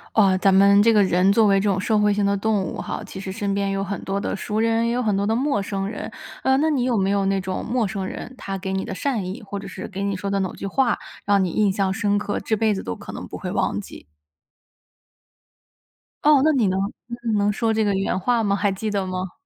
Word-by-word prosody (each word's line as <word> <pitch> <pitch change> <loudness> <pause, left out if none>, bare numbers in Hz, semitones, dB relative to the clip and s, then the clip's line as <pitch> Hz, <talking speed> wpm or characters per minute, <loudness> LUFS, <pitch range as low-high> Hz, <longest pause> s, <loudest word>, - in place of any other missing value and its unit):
呃， 195 -4 +5
咱 195 +1 +4
们 200 +1 +6
这 230 - +5
个 215 -2 +5
人 185 +1 +3
作 220 +1 +4
为 195 -1 +4
这 205 - +1
种 195 -1 +1
社 215 +2 +1
会 210 0 +3
性 205 0 +1
的 200 0 +2
动 205 0 0
物 - - -5
哈， - - -5
其 195 - -10
实 190 - -5
身 200 0 -2
边 200 0 0
有 195 - -1
很 200 0 -4
多 195 +1 -2
的 - - -2
熟 210 +2 -3
人， 230 +1 +2
也 - - 0
有 250 - 0
很 215 -4 +1
多 200 +1 0
的 220 - +1
陌 265 -3 +1
生 195 -1 -3
人。 210 - -6 0.3
呃， 265 0 +3
那 310 +3 +2
你 275 -5 +1
有 245 -2 +1
没 195 -1 +1
有 200 -1 +1
那 195 0 +1
种 185 0 -4
陌 235 -1 0
生 195 -1 -4
人， 250 - -7
他 195 -5 -5
给 190 0 -4
你 190 0 -1
的 - - -5
善 225 -1 -2
意， 190 +7 -6
或 200 -1 -6
者 200 0 -7
是 - - -7
给 195 0 -5
你 200 -1 -1
说 200 +2 -4
的 195 0 0
某 185 - -2
句 - - -6
话， 255 +4 +1 0.3
让 200 -1 +3
你 175 - -2
印 205 +1 +2
象 190 -1 0
深 205 -1 +1
刻、 205 0 -2
这 220 - -1
辈 220 0 +2
子 195 - -4
都 90 - -3
可 - - -9
能 - - -6
不 - - -8
会 - - -5
忘 - - 0
记？ - - -10 2.2
哦， 300 -1 +6
那 315 - +5
你 250 -8 +2
能 190 0 0 0.3
你 235 - -5 0.2
你 210 - +2
能 205 0 +2
说 225 +2 0
这 220 0 +1
个 205 -1 +1
原 195 -1 0
话 235 +4 +1
吗？ 200 -1 +2
还 200 0 +1
记 210 +3 -3
得 200 -2 -1
吗？ 185 0 -4
200 Hz, 295 characters per minute, -23 LUFS, 195-220 Hz, 2.2 s, 们